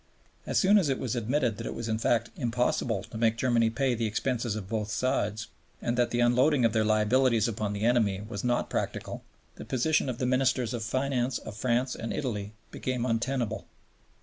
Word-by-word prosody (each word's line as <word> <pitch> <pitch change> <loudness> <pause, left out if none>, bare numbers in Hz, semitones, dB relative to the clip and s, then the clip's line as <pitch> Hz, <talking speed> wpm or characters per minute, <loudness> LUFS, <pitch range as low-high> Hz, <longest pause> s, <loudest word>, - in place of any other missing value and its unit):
As - - 0
soon 205 +2 +6
as 165 -7 0
it 135 - +1
was 125 -2 -2
admitted 120 -1 0
that - - -5
it - - -5
was 115 - -4
in 110 0 -1
fact 115 0 +1
impossible 120 -3 0
to 110 - -9
make 115 -1 +2
Germany 120 -2 +2
pay 130 +2 0
the 115 -1 -1
expenses 115 +1 -1
of 105 -3 -5
both 105 0 -2
sides, 110 -2 -1 0.3
and 120 - -1
that 120 -1 +2
the 120 - 0
unloading 125 +2 +4
of 115 - +2
their 110 -1 +2
liabilities 110 +2 +3
upon 105 -2 -2
the 100 +1 -4
enemy 110 -5 +2
was 100 -3 -5
not 120 0 +1
practicable, - - -4 0.3
the - - -7
position 140 +3 +1
of 125 - -3
the 125 - -1
Ministers 130 -2 +1
of 120 - -3
Finance 130 +1 0
of 105 - -9
France 125 +2 0
and 115 - -5
Italy 105 -6 -3 0.2
became 125 -2 -2
untenable. 120 -1 -1
120 Hz, 200 wpm, -28 LUFS, 110-130 Hz, 0.3 s, soon